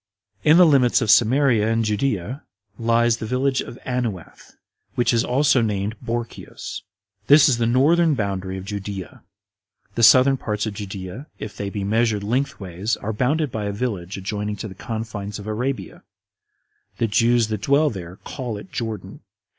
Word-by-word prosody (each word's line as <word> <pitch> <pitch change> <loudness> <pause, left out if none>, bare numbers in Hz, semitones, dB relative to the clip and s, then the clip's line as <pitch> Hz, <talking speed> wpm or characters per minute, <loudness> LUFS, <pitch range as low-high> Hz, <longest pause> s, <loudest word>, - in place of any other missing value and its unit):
5. - - -7
In 160 - +8
the 180 - +8
limits 135 -6 +4
of 115 -4 +2
Samaria 115 0 +4
and 115 0 +1
Judea 105 - -1 0.4
lies 115 0 +2
the 110 - -5
village 130 +2 +1 0.2
Anuath, 120 -9 -4 0.4
which 120 - +2
is 115 - +2
also 135 0 +3
named 105 -1 -1
Borceos. 120 0 -5 0.5
This 145 +1 +7
is 125 -4 +2
the 115 - +2
northern 155 +6 +3
boundary 95 -4 -3
of 95 - -7
Judea. 100 -2 -6 0.7
The 115 - -2
southern 130 +4 +7
parts 105 -3 -2
of 110 - -3
Judea, 100 +5 -7
if 105 - -7
they 100 - -4
be 100 0 -4
measured 110 0 +1
lengthways, 105 -4 -2
are 110 +2 -4
bounded 140 +6 0
by 110 -2 -3
a 100 - -1
Village 100 -4 -4
adjoining 105 +2 -3
to 110 - -6
the 95 - -9
confines 110 -1 -5
of 100 - -9
Arabia; 110 -2 -3 1.0
the 115 - +1
Jews 115 +1 +2
that 110 -2 -3
dwell 145 +5 +3
there 90 -4 -8
call 120 -6 -5
it 95 -2 -11
Jordan. 110 -5 -5
110 Hz, 160 wpm, -22 LUFS, 100-125 Hz, 1.0 s, In